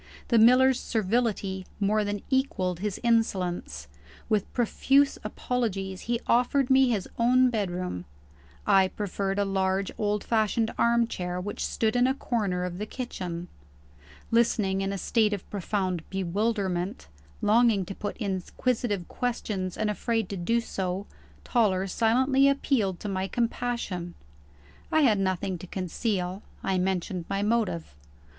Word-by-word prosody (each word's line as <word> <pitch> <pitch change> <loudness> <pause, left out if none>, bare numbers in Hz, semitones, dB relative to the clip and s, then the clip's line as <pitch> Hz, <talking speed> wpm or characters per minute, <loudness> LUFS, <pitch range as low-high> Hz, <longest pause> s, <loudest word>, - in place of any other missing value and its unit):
The 235 - +5
miller's 255 +3 +6
servility 210 -3 -1
more 210 +1 +2
than 205 -1 -3
equalled 185 -10 0
his 205 0 -3
insolence. 205 -7 0 0.4
With 210 -3 +1
profuse 270 +4 +2
apologies, 205 -4 -2
he 240 -1 +1
offered 250 +2 +2
me 265 -1 +6
his 210 -6 -1
own 250 +2 +4
bedroom. 180 - -2 0.6
I 195 -2 +5
preferred 195 0 -3
a 205 - +2
large 190 0 0
old 210 -1 0
fashioned 220 0 +1
armchair 230 -7 +1
which 205 +3 -4
stood 220 +1 0
in 245 +1 +4
a 265 - +1
corner 200 -9 -1
of 180 0 -5
the 210 - -3
kitchen. 180 -9 -5 0.8
Listening 215 -4 +2
in 195 0 -1
a 200 - -3
state 215 +1 +2
of 200 - -5
profound 190 -3 -1
bewilderment 190 - -1 0.3
longing 215 -2 +3
to 195 - -6
put 205 - -5
inquisitive 205 0 -2
questions, 210 -7 -3
and 215 - 0
afraid 225 0 -1
to 200 - -4
do 230 +6 +1
so 190 -3 -3 0.4
Toller 195 -6 +2
silently 260 +7 +3
appealed 230 -9 +1
to - - -4
my 190 -1 -1
compassion. 230 -7 -2 0.8
I 315 - +4
had 220 -8 +4
nothing 190 -1 -1
to 185 - -9
conceal; 185 +1 -2 0.2
I 190 -1 +1
mentioned 180 -1 -1
my 195 0 0
motive. 205 - 0
205 Hz, 135 wpm, -27 LUFS, 190-235 Hz, 0.8 s, miller's